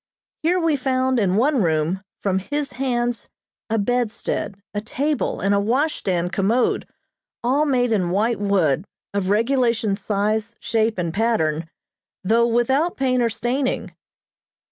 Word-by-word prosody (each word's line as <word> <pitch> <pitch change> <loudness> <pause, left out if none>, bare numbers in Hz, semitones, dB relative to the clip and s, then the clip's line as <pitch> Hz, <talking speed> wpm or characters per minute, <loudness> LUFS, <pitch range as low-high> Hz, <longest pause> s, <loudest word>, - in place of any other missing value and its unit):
Here 350 +3 +2
we 325 -4 +2
found, 260 -1 +1
in 190 -3 +2
one 260 +3 +3
room, 165 +2 +1 0.2
from 190 -2 +1
his 290 +7 -3
hands 245 -2 -1 0.4
a 225 - +1
bedstead, 220 -2 -1
a 205 - -2
table, 280 +6 -1
and 200 +1 +1
a 200 - +3
washstand 200 - 0
commode, 220 +6 +1 0.6
all 275 +5 +2
made 250 -4 +2
in 185 -5 +1
white 215 +5 +1
wood, 185 -6 +1 0.3
of 200 -2 -1
regulation 230 -1 +2
size, 215 +3 -1
shape 225 -1 0
and 170 -2 -2
pattern, 165 -8 0 0.5
though 230 +4 +3
without 265 +8 +1
paint 255 -2 +1
or 235 - +2
staining. 255 +4 -1
230 Hz, 135 wpm, -22 LUFS, 200-255 Hz, 0.6 s, one